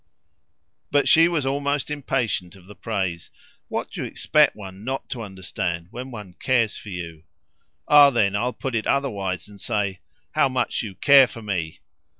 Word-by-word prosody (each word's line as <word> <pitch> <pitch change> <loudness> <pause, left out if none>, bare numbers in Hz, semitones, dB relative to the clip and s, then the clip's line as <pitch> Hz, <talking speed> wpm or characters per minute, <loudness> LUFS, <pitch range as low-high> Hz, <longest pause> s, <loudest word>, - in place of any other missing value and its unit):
But 145 0 +2
she 165 +1 +7
was 165 -5 -1
almost 140 +1 -1
impatient 125 -10 -2
of 95 -2 -17
the 100 - -12
praise. 95 -6 -3 0.4
"What - - -4
do - - -5
you - - -3
expect - - +3
one 95 -1 -10
NOT 135 +3 -4
to 120 - -4
understand 95 -4 -4
when 125 +2 -7
one 105 -7 -9
cares 120 -5 +1
for 105 - -9
you?" 85 -4 -7 0.7
"Ah 145 -1 +8
then 105 -6 +1
I'll 120 +5 0
put 130 0 -5
it 110 -1 -1
otherwise 100 -11 -1
and 100 -1 -14
say 100 -5 -1 0.3
'How 135 - +3
much 130 0 -1
you 100 -4 -7
care 140 +1 +7
for 115 -2 -10
me!'" 90 -6 -3
110 Hz, 170 wpm, -23 LUFS, 95-135 Hz, 0.7 s, Ah